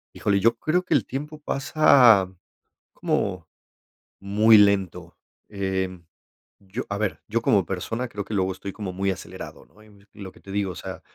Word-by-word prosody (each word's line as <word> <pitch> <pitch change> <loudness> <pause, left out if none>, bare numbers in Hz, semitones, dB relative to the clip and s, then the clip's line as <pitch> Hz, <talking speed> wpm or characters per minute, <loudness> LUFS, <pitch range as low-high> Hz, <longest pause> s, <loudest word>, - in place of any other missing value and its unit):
Híjole, 100 -1 +1
yo 115 +3 +3
creo 175 +7 0
que - - 0
el - - +2
tiempo 150 +3 -6
pasa 130 -10 +4 0.6
como, 90 -4 -2 0.8
muy 105 +3 +5
lento, 95 -4 +1 0.3
eh, 95 -2 -3 0.6
yo, 100 +5 -6
a 100 - -2
ver, 105 -2 -2
yo 115 +2 0
como 100 -5 +2
persona 115 +7 -4
creo 100 -3 -6
que 110 - -7
luego 95 -1 0
estoy 100 +1 -7
como 100 -4 -6
muy 95 +2 -2
acelerado, - - -9
¿no?, 105 - -23
y 105 -2 -20
lo 95 -3 -9
que - - -20
te 95 - -11
digo, 100 -2 -1
o - - -10
sea, - - -8
100 Hz, 170 wpm, -24 LUFS, 95-115 Hz, 0.8 s, muy